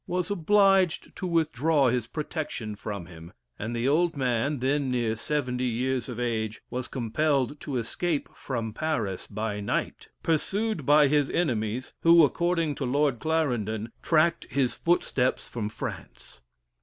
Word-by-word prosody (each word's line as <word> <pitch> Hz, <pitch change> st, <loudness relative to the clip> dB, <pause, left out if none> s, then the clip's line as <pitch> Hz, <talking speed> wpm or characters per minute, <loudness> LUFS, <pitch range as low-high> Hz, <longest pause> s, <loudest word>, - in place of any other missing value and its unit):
was 180 Hz, +1 st, -1 dB
obliged 195 Hz, -1 st, +3 dB
to 185 Hz, -, -4 dB
withdraw 160 Hz, -3 st, +2 dB
his 120 Hz, -2 st, 0 dB
protection 150 Hz, -7 st, -4 dB
from 100 Hz, -3 st, -6 dB
him, 85 Hz, -1 st, -12 dB, 0.3 s
and 115 Hz, +3 st, -3 dB
the 120 Hz, +2 st, 0 dB
old 165 Hz, +2 st, +2 dB
man, 130 Hz, +2 st, 0 dB
then 135 Hz, +2 st, 0 dB
near 120 Hz, -3 st, 0 dB
seventy 125 Hz, -1 st, -1 dB
years 125 Hz, +2 st, -1 dB
of 120 Hz, -1 st, -5 dB
age, 110 Hz, -3 st, -2 dB
was 125 Hz, 0 st, -3 dB
compelled 135 Hz, +3 st, 0 dB
to 140 Hz, -4 st, -3 dB
escape 145 Hz, +7 st, -1 dB
from 115 Hz, -5 st, -4 dB
Paris 110 Hz, -, -2 dB
by 105 Hz, -1 st, -3 dB
night, 100 Hz, -, -2 dB, 0.2 s
pursued 190 Hz, -, 0 dB
by 145 Hz, 0 st, +6 dB
his 145 Hz, 0 st, +2 dB
enemies, 120 Hz, -6 st, -1 dB
who, 170 Hz, 0 st, +7 dB
according 170 Hz, 0 st, 0 dB
to 140 Hz, -, -5 dB
Lord 135 Hz, -1 st, +1 dB
Clarendon, 120 Hz, -9 st, -1 dB
tracked 170 Hz, +1 st, +2 dB
his 135 Hz, -3 st, +1 dB
footsteps 140 Hz, -7 st, 0 dB
from 110 Hz, -3 st, -4 dB
France. 105 Hz, -, -8 dB
135 Hz, 145 wpm, -27 LUFS, 115-160 Hz, 0.3 s, who